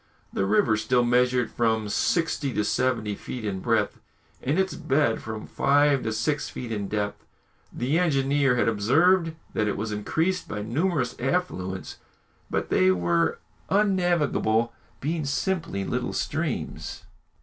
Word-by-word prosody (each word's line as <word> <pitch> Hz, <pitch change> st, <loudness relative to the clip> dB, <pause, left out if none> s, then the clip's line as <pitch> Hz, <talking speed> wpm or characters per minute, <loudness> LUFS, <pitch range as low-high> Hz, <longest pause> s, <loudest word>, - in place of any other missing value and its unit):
The 95 Hz, -, 0 dB
river 110 Hz, +2 st, +3 dB
still 120 Hz, +3 st, +2 dB
measured 125 Hz, 0 st, +2 dB
from 110 Hz, -2 st, +1 dB
sixty 155 Hz, -, 0 dB
to 105 Hz, -, +1 dB
seventy 115 Hz, -3 st, 0 dB
feet 115 Hz, +3 st, -6 dB
in 95 Hz, -2 st, -2 dB
breadth, -, -, 0 dB, 0.4 s
and 140 Hz, +6 st, 0 dB
its 190 Hz, -1 st, +1 dB
bed 145 Hz, -7 st, +1 dB
from 110 Hz, -1 st, -6 dB
five 145 Hz, -1 st, +3 dB
to 110 Hz, -, -2 dB
six 145 Hz, +7 st, -1 dB
feet 120 Hz, -2 st, -6 dB
in 105 Hz, -2 st, -2 dB
depth. 105 Hz, 0 st, -3 dB, 0.5 s
The 140 Hz, +7 st, 0 dB
engineer 140 Hz, -5 st, +2 dB
had 120 Hz, -, +2 dB
observed 160 Hz, -, +3 dB, 0.2 s
that 110 Hz, -, +1 dB
it 105 Hz, -, -1 dB
was 110 Hz, +1 st, -3 dB
increased 160 Hz, -, -1 dB
by 105 Hz, 0 st, -4 dB
numerous 135 Hz, -, 0 dB
affluents, 120 Hz, -, -2 dB, 0.5 s
but -, -, -2 dB
they 95 Hz, -, +4 dB
were 85 Hz, -2 st, +2 dB, 0.3 s
unnavigable, 175 Hz, -, +2 dB, 0.3 s
being 155 Hz, +3 st, -1 dB
simply 145 Hz, -, -1 dB
little 125 Hz, +3 st, -2 dB
streams. 155 Hz, -2 st, -3 dB
125 Hz, 140 wpm, -26 LUFS, 110-155 Hz, 0.5 s, they